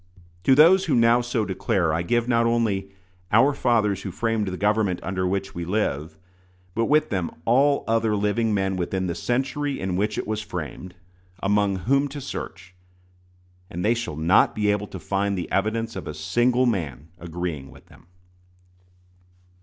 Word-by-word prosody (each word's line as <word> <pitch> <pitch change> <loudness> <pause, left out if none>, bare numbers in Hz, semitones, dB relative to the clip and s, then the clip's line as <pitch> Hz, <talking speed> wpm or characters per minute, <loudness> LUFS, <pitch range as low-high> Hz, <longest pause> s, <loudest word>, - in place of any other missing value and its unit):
To 135 - +6
those 175 +6 +6
who 160 - +1
now 115 +1 +4
so 120 -2 -1
declare 90 -4 0
I 85 - 0
give 120 +6 0
not 115 -1 +2
only 105 -5 0 0.4
"our 130 +7 +5
fathers 105 -7 +1
who 95 - -5
framed 110 +2 -1
the 90 -1 -4
government 105 -2 +1
under 95 -1 -1
which 95 +1 -2
we 85 - -5
live," 80 -5 -2 0.6
but 115 +3 0
with 150 +1 +2
them 90 -5 -1 0.2
all 140 +4 +3
other 115 -1 +1
living 105 +2 0
men 95 -2 0
within 95 +1 -2
the 85 - -2
century 135 - -2
in 95 -1 -2
which 105 +3 -1
it - - -2
was 110 0 -2
framed, 90 - -7 0.5
among 100 0 +2
whom 140 +3 +3
to 145 +1 -7
search, 95 -8 -7 1.0
and 90 +3 -4
they 115 - +4
shall 115 -9 -4
not 80 +4 +3
be 105 -1 +2
able 105 0 -2
to - - -8
find 100 0 -1
the 90 - -5
evidence 115 +3 -1
of - - -6
a - - -5
single 125 +1 +1
man 80 - -2
agreeing 85 -5 -5
with - - -16
them. - - -20
105 Hz, 170 wpm, -24 LUFS, 95-120 Hz, 1.0 s, To